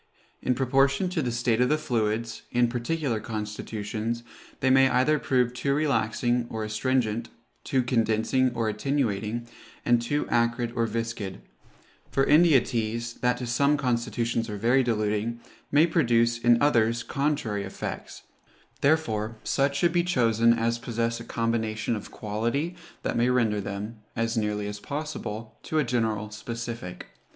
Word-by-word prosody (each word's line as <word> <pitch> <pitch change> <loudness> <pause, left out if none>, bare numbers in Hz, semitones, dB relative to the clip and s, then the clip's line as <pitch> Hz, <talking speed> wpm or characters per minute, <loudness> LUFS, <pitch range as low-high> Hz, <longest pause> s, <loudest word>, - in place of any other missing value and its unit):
In 125 - +1
proportion 135 +6 +2
to 180 -3 -1
the 125 -4 -1
state 120 0 +1
of 125 - +3
the 155 - +3
fluids, 115 -5 -1
in 120 0 +3
particular 125 0 -1
constitutions, 110 +1 -4 0.4
they 130 - +2
may 135 0 +6
either 140 +5 +3
prove 125 -3 +1
too 140 +3 0
relaxing 120 -4 +1
or 110 -1 -3
astringent, 115 +1 0 0.3
too 130 -2 +1
condensing 120 +1 +2
or 115 -1 0
attenuating, 115 -1 -1 0.4
and 120 -1 +4
too 145 +5 -1
acrid 115 0 +1
or 115 -1 +1
viscid; 115 - -4 0.7
for 135 - +2
India 150 -2 +6
teas, 115 0 -2
that 125 0 +2
to 125 - -4
some 140 +5 +2
constitutions 115 -3 -1
are 105 - -4
very 120 +6 +3
diluting, 110 -1 -1 0.3
may 150 +3 +6
produce 120 -8 +2
in 120 0 +4
others 115 -5 +3
contrary 140 -8 -1
effects: - - -6 0.6
therefore 115 -8 +1
such 140 0 +1
should 170 +3 +2
be 175 -1 +3
chosen 115 -8 +3
as 115 0 +1
possess 115 -1 -2
a - - -7
combination 115 -1 -1
of 105 - -7
quality 120 - -2 0.3
that - - -1
may 120 +1 +3
render 115 -5 +2
them, 105 +3 -5 0.2
as 115 0 0
nearly 105 -2 -1
as 105 0 -5
possible, 140 -6 -5
to 155 - -3
a 155 - +4
general 110 -4 -1
specific. 115 -3 -6
115 Hz, 145 wpm, -27 LUFS, 110-130 Hz, 0.7 s, may